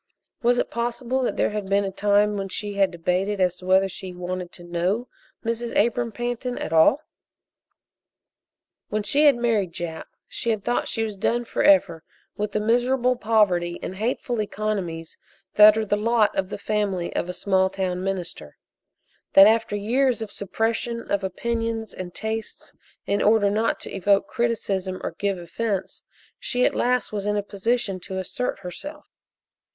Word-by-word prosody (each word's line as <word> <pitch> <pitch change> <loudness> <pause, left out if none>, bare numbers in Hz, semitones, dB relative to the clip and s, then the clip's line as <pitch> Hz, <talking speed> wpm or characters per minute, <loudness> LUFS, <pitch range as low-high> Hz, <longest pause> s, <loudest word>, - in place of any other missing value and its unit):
Was 245 0 +3
it - - -1
possible 240 +2 -1
that 250 - -1
there - - +2
had 210 -2 -4
been 200 +1 +3
a 195 - -3
time 205 +1 +2
when 195 -1 -3
she 205 +2 -4
had 195 -1 +3
debated 180 +4 -1
as 180 -1 +2
to 180 - -11
whether 190 +1 +4
she 185 0 -8
wanted 180 0 -5
to 175 - -12
know 180 +8 -1 0.4
Mrs. 230 +1 -2
Abram 235 +2 +2
Pantin 245 +1 -3
at 160 - -4
all? 200 - +5 1.9
When 215 0 -1
she 290 +8 +3
had 285 -3 +7
married 225 -7 0
Jap 165 -2 -5 0.2
she 235 - -3
had 215 -3 0
thought 240 +3 0
she 225 - -1
was 215 -2 -4
done 240 +5 0
forever 195 - +3 0.3
with 210 0 -3
the - - +1
miserable 245 +3 +2
poverty 195 -7 +2
and - - -4
hateful 235 +1 -1
economies 195 -6 -4 0.3
that 210 +1 +8
are 220 - 0
the 205 - +1
lot 220 +1 +2
of 190 -1 -1
the - - -5
family 200 -5 -2
of 180 - -1
a - - 0
small 190 0 +1
town 185 -1 -2
minister; 175 - -5 0.8
that 195 - +10
after 220 -1 +3
years 245 +5 +1
of 210 - -8
suppression 225 +3 -2
of 200 -1 +1
opinions 225 +3 -2
and 180 -1 -7
tastes 220 0 -5 0.3
in 200 - 0
order 205 -1 +4
not 220 +2 0
to - - -7
evoke 200 +1 +3
criticism 195 -5 -1
or - - -2
give 200 -2 0
offense, 190 +2 -3 0.4
she 250 0 0
at - - +2
last 250 0 +1
was 205 -1 -3
in 210 0 +1
a 205 - -1
position 200 0 -1
to 190 +1 -6
assert 220 +7 -3
herself. 295 - -8
205 Hz, 170 wpm, -24 LUFS, 190-230 Hz, 1.9 s, that